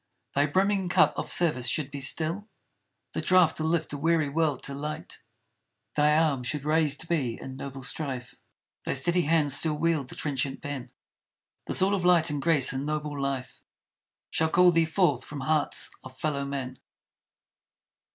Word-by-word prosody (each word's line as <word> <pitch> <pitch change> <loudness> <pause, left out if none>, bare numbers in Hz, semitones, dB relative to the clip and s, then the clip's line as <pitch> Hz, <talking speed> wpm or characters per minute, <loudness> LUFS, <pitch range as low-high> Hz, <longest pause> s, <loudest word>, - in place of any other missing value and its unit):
Thy 145 +1 +2
brimming 190 +3 +1
cup - - +4
of - - -4
service 150 -8 +2
should 145 +3 0
be 140 0 -6
still 165 +9 0 0.6
The - - -3
draught 180 -3 +4
to 155 - -2
lift 160 -1 -1
a 145 - -4
weary 160 -1 +2
world 150 -2 0
to 140 - -3
light. 150 +2 -6 0.7
Thy 150 +1 +4
arm 155 -5 +2
should 140 +3 -2
raiséd 155 0 +1
be 140 -9 -1
in 130 - -8
noble 135 0 -7
strife; 130 -2 -4 0.5
Thy - - -1
steady 175 +7 +2
hand 155 -2 +2
still 150 +2 +1
wield 155 -3 0
the - - -8
trenchant 135 -2 -2
pen; 135 -3 -5 0.8
Thus - - +3
all 195 +1 +2
of 195 -3 -1
light 170 -3 +4
and 145 -1 -2
grace 145 -5 +3
and 135 +1 -3
noble 150 0 -3
life 135 -2 -4 0.7
Shall 160 0 +1
call 180 +2 +5
thee 165 -1 +3
forth 155 -6 +1
from 145 -2 -7
hearts 155 +2 +1
of 130 0 -12
fellowmen! 140 -3 -3
150 Hz, 165 wpm, -27 LUFS, 140-165 Hz, 0.8 s, call